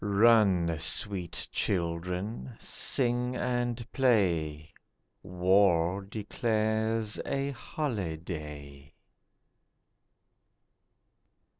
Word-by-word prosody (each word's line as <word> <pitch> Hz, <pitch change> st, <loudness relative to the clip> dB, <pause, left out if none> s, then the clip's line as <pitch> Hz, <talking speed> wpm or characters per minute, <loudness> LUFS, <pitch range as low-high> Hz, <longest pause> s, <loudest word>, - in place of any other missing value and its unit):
Run, 100 Hz, -5 st, +4 dB
sweet 90 Hz, +2 st, -2 dB
children, 90 Hz, +6 st, -2 dB
sing 125 Hz, -1 st, 0 dB
and 120 Hz, -1 st, -1 dB
play; 85 Hz, -, +1 dB, 0.5 s
War 90 Hz, 0 st, +3 dB
declares 110 Hz, +1 st, -1 dB
a 140 Hz, 0 st, -1 dB
holiday. 80 Hz, -, -5 dB
100 Hz, 50 wpm, -30 LUFS, 85-115 Hz, 0.5 s, Run